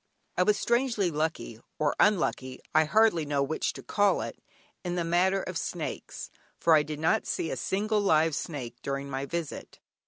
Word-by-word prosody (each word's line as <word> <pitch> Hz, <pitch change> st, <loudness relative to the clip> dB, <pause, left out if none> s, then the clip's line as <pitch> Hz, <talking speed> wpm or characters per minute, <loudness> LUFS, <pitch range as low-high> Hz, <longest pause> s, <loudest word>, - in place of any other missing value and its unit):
I -, -, +2 dB
was 205 Hz, +3 st, +3 dB
strangely 235 Hz, -6 st, +1 dB
lucky 155 Hz, -7 st, -3 dB, 0.2 s
(or 150 Hz, -1 st, +1 dB
unlucky, 135 Hz, -10 st, +1 dB
I 155 Hz, 0 st, +5 dB
hardly 215 Hz, -1 st, +3 dB
know 145 Hz, -1 st, 0 dB
which 155 Hz, +3 st, -1 dB
to -, -, -10 dB
call 205 Hz, -1 st, +2 dB
it) -, -, -6 dB, 0.4 s
in 175 Hz, -1 st, -2 dB
the 175 Hz, -, 0 dB
matter 185 Hz, +3 st, +2 dB
of -, -, -3 dB
snakes, -, -, -5 dB, 0.3 s
for 165 Hz, -, +4 dB
I 155 Hz, -, +6 dB
did 150 Hz, 0 st, -5 dB
not 160 Hz, +1 st, +1 dB
see 165 Hz, -, -2 dB
a -, -, -1 dB
single 210 Hz, +2 st, 0 dB
live 160 Hz, -4 st, +3 dB
snake 130 Hz, -6 st, -5 dB
during 140 Hz, 0 st, -4 dB
my 135 Hz, +1 st, -3 dB
visit. 170 Hz, -1 st, -5 dB
165 Hz, 180 wpm, -28 LUFS, 145-195 Hz, 0.4 s, I